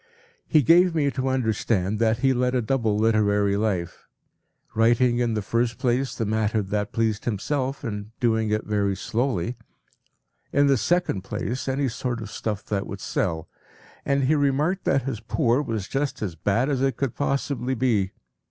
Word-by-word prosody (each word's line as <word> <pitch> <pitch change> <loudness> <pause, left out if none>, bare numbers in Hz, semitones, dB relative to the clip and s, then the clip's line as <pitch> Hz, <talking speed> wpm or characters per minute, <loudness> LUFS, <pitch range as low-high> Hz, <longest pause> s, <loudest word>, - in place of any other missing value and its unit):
He 155 -3 +4
gave 175 +5 +5
me 145 -3 +2
to 130 0 -2
understand 110 -5 0
that 110 -1 +2
he 135 - +5
led 125 0 0
a 125 - +2
double 110 -4 +1
literary 105 -2 +2
life; 95 -5 -2 0.7
writing 120 +2 +3
in 120 -2 +1
the 105 - -2
first 115 +3 0
place 130 +2 0
the 115 - -2
matter 110 0 0
that 105 +1 -2
pleased 110 -2 -1
himself, 130 +5 -2
and 105 -3 -4
doing 110 -2 +1
it 110 0 -1
very 100 -2 0
slowly; 120 0 -1 0.9
in 145 0 +4
the 140 -1 +4
second 135 - +1
place, 115 +7 -4
any 135 +1 0
sort 125 0 -3
of 110 -2 -7
stuff 105 -1 -4
that 100 -1 -2
would 100 - -6
sell. 85 -4 -2 0.6
And 140 0 +1
he 135 +4 +3
remarked 150 +5 +1
that 135 - +2
his 130 -4 -3
poor 120 +3 +1
was 110 -8 -3
just 140 -4 -2
as 95 -5 -3
bad 100 - 0
as 135 -3 0
it 135 -1 +1
could 135 -4 -1
possibly 135 -2 -1
be. 110 -6 +1
115 Hz, 170 wpm, -24 LUFS, 105-135 Hz, 0.9 s, gave